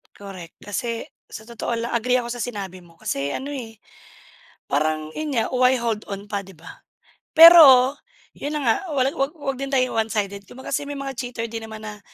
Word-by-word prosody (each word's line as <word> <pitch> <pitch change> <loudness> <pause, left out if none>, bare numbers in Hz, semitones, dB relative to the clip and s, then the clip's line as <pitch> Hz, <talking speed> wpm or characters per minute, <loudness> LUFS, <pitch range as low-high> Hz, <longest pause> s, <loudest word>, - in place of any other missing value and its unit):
Correct 190 -4 -10
kasi, 230 +3 -4 0.2
sa 220 0 -9
totoo 235 0 -5
lang 235 +1 -4
agree 250 +2 +2
ako 240 - -5
sa 240 0 -4
sinabi 195 -6 -6
mo 165 -1 -21
kasi 140 +1 -2
ano, 265 - -5
eh, 225 -5 -8 0.9
parang 155 +1 -1
yun 310 -1 -3
nga, 225 - +1
why 255 0 +4
hold 225 -2 -2
on 200 +1 -6
pa 200 -1 -1
'di 195 -1 -15
ba? 165 +1 -14 0.5
Pero, 295 -6 +9 0.4
yun 290 - -5
na - - -1
nga 225 -2 +3 0.2
wala 265 -2 +2
wag 275 +2 -1
wag 275 -3 -3
din 275 0 -4
tayong 255 -3 +1
one-sided 200 -2 -3
kung 260 - -12
kasi 275 +2 -2
may 290 - -4
mga 275 -1 -5
cheater 245 -3 -4
din 225 0 -6
naman 220 0 -9
na 210 -1 -7
230 Hz, 200 wpm, -22 LUFS, 200-260 Hz, 0.9 s, Pero